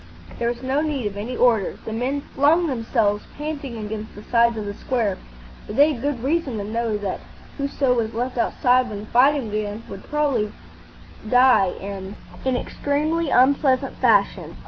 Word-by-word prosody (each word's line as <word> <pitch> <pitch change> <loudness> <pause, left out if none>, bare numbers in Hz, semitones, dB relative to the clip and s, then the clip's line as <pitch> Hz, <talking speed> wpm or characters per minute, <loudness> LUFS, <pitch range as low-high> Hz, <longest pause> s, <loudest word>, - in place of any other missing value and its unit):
There 235 - 0
was 240 +2 -3
no 265 +3 +1
need 295 -6 -2
of 205 -1 -3
any 225 +5 -4
order. 230 -6 +2
The 220 - -4
men 260 +5 -1
flung 310 +5 +4
themselves 225 -6 0
panting 290 -5 -5
against 215 0 -6
the 205 - -10
sides 235 0 +3
of 215 - -4
the 205 - -4
square, 220 -4 -1 0.5
for 210 - -6
they 290 +6 +5
had 240 - -7
good 275 -4 -2
reason 280 -4 0
to 205 - -3
know 225 +1 -1
that 200 -2 -3 0.4
whoso 275 -2 +1
was 225 -2 -1
left 250 +2 -2
outside 250 +1 +2
when 205 -1 -6
the - - -9
fighting 255 0 +3
began 210 +1 -3
would 195 - -7
very - - -17
probably 280 -8 0 0.8
die 250 -6 +5
in 195 0 -6 0.3
an 260 -1 +2
extremely 305 +5 -1
unpleasant 265 0 +3
fashion. - - +2
245 Hz, 175 wpm, -22 LUFS, 215-275 Hz, 0.8 s, they